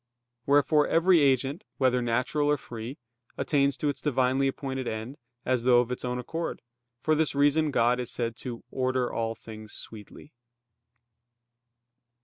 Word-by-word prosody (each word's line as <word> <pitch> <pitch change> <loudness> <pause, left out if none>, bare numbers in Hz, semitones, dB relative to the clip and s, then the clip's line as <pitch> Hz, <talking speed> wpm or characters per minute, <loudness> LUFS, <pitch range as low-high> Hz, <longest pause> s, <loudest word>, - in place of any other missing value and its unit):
Wherefore 145 +1 +4
every 170 0 +4
agent, 140 - +2
whether 130 -2 +2
natural 125 +5 0
or 150 - +3
free, 120 +1 -8 0.4
attains 140 -2 +1
to 150 - -1
its 145 - -2
divinely 135 -1 +2
appointed 135 -1 -3
end, 110 +5 -4 0.3
as 130 -1 +1
though 120 0 +5
of 120 0 0
its 125 - -4
own 125 0 -2
accord. 165 +7 -4 0.4
For 155 +6 +1
this 155 -2 +1
reason 145 +2 +3
God 120 -2 +2
is 125 - -3
said 115 -2 -2
"to 120 -3 -7
order 130 -1 0
all 115 0 -2
things 110 -1 -10
sweetly." 110 +7 -11
130 Hz, 145 wpm, -28 LUFS, 120-145 Hz, 0.4 s, though